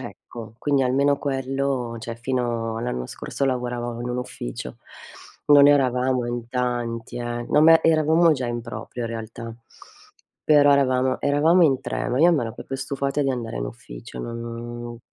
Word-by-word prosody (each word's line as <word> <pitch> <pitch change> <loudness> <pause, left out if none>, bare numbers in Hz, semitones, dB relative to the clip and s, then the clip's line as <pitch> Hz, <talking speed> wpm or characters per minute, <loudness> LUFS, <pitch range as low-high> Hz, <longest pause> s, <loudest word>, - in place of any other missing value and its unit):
Ecco, 110 -2 -10
quindi 140 0 +1
almeno 140 +2 +2
quello, 135 -3 -2
cioè 115 0 -6
fino 120 -2 -2
all'anno 115 - -3
scorso 140 - -4
lavoravo 120 -2 -2
in 120 - -4
un 125 - -2
ufficio. 125 - -6 0.7
Non 145 -1 +8
eravamo 130 -3 +2
in 120 -1 -4
tanti, 120 -2 -3
eh, 120 0 -4
no 150 - +4
ma 165 0 +7
eravamo 160 +1 +4
già 130 -4 -2
in 120 0 -3
proprio 115 +1 -7
in - - -3
realtà, 115 0 -7 0.9
però 145 -2 +6
eravamo 130 -2 +2
eravamo 155 +5 +4
in 135 -5 +3
3, - - -3
ma, 130 +4 0
io 175 - +6
m'ero 120 -8 -1
proprio 135 - -6
stufata 140 +1 -2
di 135 - +1
andare 120 - -4
in - - -2
ufficio, - - -10
non, 115 - -6
uhm 120 0 -7
125 Hz, 165 wpm, -23 LUFS, 120-140 Hz, 0.9 s, Non